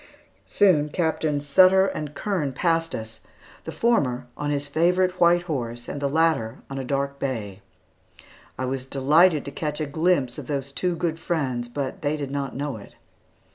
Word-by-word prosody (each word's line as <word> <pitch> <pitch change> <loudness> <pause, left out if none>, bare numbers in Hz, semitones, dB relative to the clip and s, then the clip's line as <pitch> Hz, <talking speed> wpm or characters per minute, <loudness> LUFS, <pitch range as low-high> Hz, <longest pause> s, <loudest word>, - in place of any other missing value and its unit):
Soon 155 -7 +3
Captains 155 -3 -1
Sutter 185 +6 +6
and 150 -6 -4
Kern 170 -10 -2
passed 165 +2 0
us, 110 0 -6 0.5
the - - -5
former 130 - +1
on 145 - -3
his 145 -1 -1
favorite 180 +4 +1
white 175 0 +5
horse, 120 -8 -4
and 145 - -5
the 140 - 0
latter 155 -7 +1
on 135 - -4
a - - -3
dark 140 +1 -2
bay. 105 -7 -4 1.0
I 130 - -2
was 130 0 -3
delighted 150 +5 +4
to 140 - -5
catch 150 +1 -4
a 155 - -1
glimpse 150 -3 0
of 135 - -9
those 140 -1 -3
two 180 +5 -1
good 165 -1 -2
friends, 135 -8 -2
but 140 +8 -4
they 150 0 0
did 140 -2 -5
not 140 -2 -3
know 140 -3 -3
it. 100 - -14
145 Hz, 175 wpm, -24 LUFS, 135-165 Hz, 1.0 s, Sutter